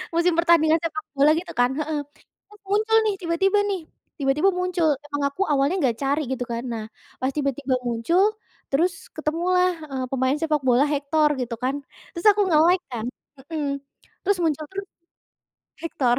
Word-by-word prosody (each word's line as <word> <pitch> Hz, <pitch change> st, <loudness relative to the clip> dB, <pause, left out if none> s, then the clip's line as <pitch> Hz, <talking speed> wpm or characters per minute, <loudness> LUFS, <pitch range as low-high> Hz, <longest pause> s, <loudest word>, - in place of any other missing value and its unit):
musim 340 Hz, 0 st, +3 dB
pertandingan 335 Hz, -1 st, +4 dB
sepak 315 Hz, -2 st, -3 dB
bola 285 Hz, +2 st, +4 dB
gitu 345 Hz, +1 st, -5 dB
kan? 245 Hz, 0 st, +3 dB
Heeh, 305 Hz, 0 st, -1 dB, 0.5 s
itu -, -, -14 dB
muncul 430 Hz, +3 st, +2 dB
nih 420 Hz, -, +2 dB
tiba-tiba 385 Hz, +4 st, +2 dB
nih, 385 Hz, -2 st, -1 dB, 0.4 s
tiba-tiba 285 Hz, +7 st, +2 dB
muncul 360 Hz, -3 st, 0 dB, 0.2 s
emang 290 Hz, 0 st, -4 dB
aku 325 Hz, +8 st, -7 dB
awalnya 280 Hz, +5 st, +2 dB
nggak 240 Hz, -6 st, +1 dB
cari 280 Hz, +3 st, +1 dB
gitu 255 Hz, -, -3 dB
kan 235 Hz, +1 st, -3 dB
nah, 220 Hz, -1 st, -4 dB, 0.4 s
pas 260 Hz, -, +1 dB
tiba-tiba 275 Hz, -2 st, 0 dB
muncul, 240 Hz, +11 st, +2 dB, 0.5 s
terus 350 Hz, +6 st, +3 dB, 0.2 s
ketemulah, 360 Hz, +4 st, +1 dB, 0.2 s
eee, 260 Hz, -1 st, -2 dB
pemain 260 Hz, +2 st, +1 dB
sepak 305 Hz, -3 st, +1 dB
bola 255 Hz, +3 st, +4 dB
Hector 295 Hz, +1 st, +2 dB
gitu 245 Hz, -2 st, -3 dB
kan 265 Hz, +2 st, +1 dB, 0.4 s
terus 340 Hz, -, -5 dB
aku 410 Hz, +1 st, 0 dB
nge-like 340 Hz, +3 st, +4 dB
kan, 230 Hz, -2 st, -4 dB, 0.5 s
mhm, 300 Hz, -3 st, -1 dB, 0.6 s
terus 400 Hz, 0 st, +2 dB
muncul 310 Hz, -2 st, 0 dB
tuh. 395 Hz, +1 st, -3 dB, 1.0 s
Hector 255 Hz, -7 st, +1 dB
310 Hz, 160 wpm, -24 LUFS, 275-350 Hz, 1.0 s, pertandingan